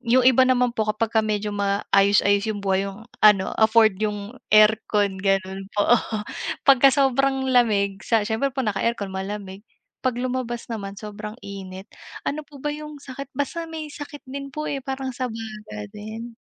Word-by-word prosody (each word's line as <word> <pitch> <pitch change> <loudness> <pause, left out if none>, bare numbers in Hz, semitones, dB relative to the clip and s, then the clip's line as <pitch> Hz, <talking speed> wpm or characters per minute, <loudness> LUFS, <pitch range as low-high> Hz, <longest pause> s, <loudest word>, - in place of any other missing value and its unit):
yung 250 +1 +3
iba 260 0 +6
naman 250 -1 +3
po, 220 -2 -1
kapagka 220 +1 +1
medyo, 210 -1 -2
maayos-ayos 200 +1 +2
yung 205 -2 -3
buhay, 195 0 +1
yung 200 +3 -10 0.2
ano, 205 -3 +5
afford 220 -2 +4
yung 210 0 -2 0.2
aircon, 210 -2 +4
gano'n 195 0 -1
po. 205 +3 +4 0.7
Pagka 275 -1 +7
sobrang 270 0 +2
lamig, 205 -5 +2
sa 225 -2 +1
siyempre 225 +5 0
po 265 -1 -3
naka-aircon 205 -1 -1
malamig. 195 0 -5 0.4
'Pag 255 -2 0
lumabas 245 -1 -3
naman 200 -3 -5
sobrang 210 +1 -7
init, 190 -1 -8 0.4
ano 300 - -2
po 290 - -13
ba 295 +2 -3
yung 300 0 -8
sakit? 275 -1 -8
Basta 330 +4 -2
may 315 -2 -6
sakit 290 0 -9
din 275 +1 -6
po 305 +3 -5
eh, 280 -2 -2
parang 265 0 -4
sa 255 +1 -3
baga 215 - -7
din. 220 +3 -8
220 Hz, 160 wpm, -23 LUFS, 200-260 Hz, 0.7 s, Pagka